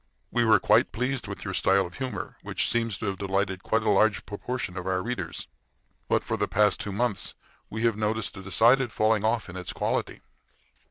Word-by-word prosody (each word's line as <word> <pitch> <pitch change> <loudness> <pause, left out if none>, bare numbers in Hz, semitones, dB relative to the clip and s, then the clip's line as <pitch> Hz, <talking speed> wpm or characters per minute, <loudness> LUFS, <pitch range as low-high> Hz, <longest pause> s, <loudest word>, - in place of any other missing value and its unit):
We 120 -1 +2
were 110 - +6
quite - - +4
pleased 125 +3 -2
with - - -7
your - - -3
style 95 0 +3
of 90 - -9
humor, 130 -5 -4
which - - -1
seems 115 -3 0
to - - -5
have 95 -2 -2
delighted 95 -1 -1
quite 110 +2 0
a 110 - +1
large 105 +2 +3
proportion 105 -1 -4
of 95 -1 -5
our 95 -1 0
readers. 100 -8 -4 0.6
But - - +2
for - - -2
the - - 0
past 105 -2 +3
two 100 - -3
months 105 0 -1 0.3
we 110 +1 -4
have 115 -2 +3
noticed 110 +1 -1
a 95 - -8
decided 115 +7 +4
falling 110 -1 +2
off 110 +1 +1
in 85 - -9
its 90 -1 -4
quality. - - -2
105 Hz, 205 wpm, -27 LUFS, 95-115 Hz, 0.6 s, were